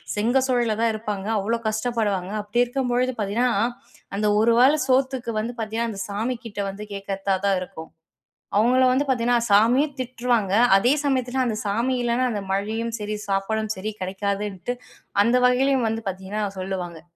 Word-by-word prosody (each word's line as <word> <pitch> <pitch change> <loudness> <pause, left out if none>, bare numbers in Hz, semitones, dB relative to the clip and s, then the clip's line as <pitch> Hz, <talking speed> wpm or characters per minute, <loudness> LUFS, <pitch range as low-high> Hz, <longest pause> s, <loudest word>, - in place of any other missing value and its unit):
செங்க 235 +6 +2
சூழையில 240 -4 +1
தான் 230 -1 +3
இருப்பாங்க, 210 -2 -4
அவ்ளோ 225 +4 0
கஷ்டப்படுவாங்க. 215 -4 -1
அப்பிடி 225 +4 +1
இருக்கும்பொழுது 250 0 0
பார்த்தீங்கன்னா, 220 +5 +1 0.7
அந்த 210 +1 0
ஒரு 230 +2 +4
வேள 265 +4 +6
சோத்துக்கு 260 -2 +1
வந்து 235 +3 -3
பார்த்தீங்கன்னா, 225 +1 -2
அந்த 195 -2 -6
சாமிக்கிட்ட 230 0 -4
வந்து 205 +2 -7
கேட்கிறதா 195 0 -2
தான் 195 -2 +3
இருக்கும். 160 -3 -8 0.7
அவுங்கள 250 +4 +4
வந்து 275 +3 +2
பார்த்தீங்கன்னா, 245 -2 +2
சாமியும் 250 +8 +4
திட்டுவாங்க, 240 -5 0 0.2
அதே 245 +7 +3
சமயத்துல 260 -1 +1
அந்த 225 -3 -1
சாமி 230 +6 0
இல்லன்னா 240 +1 +1
அந்த 205 -2 -3
மழையும் 220 +4 -2
சரி, 210 0 -3
சாப்பாடும் 215 +2 -1
சரி 215 +3 -3
கிடைக்காதுன்ட்டு, 200 +2 -3 0.5
அந்த 235 +3 +2
வகையிலேயும் 255 -1 +2
வந்து 225 0 -3
பார்த்தீங்கன்னா 190 +3 -4 0.2
சொல்லுவாங்க. 180 -3 -4
225 Hz, 145 wpm, -23 LUFS, 200-245 Hz, 0.7 s, வேள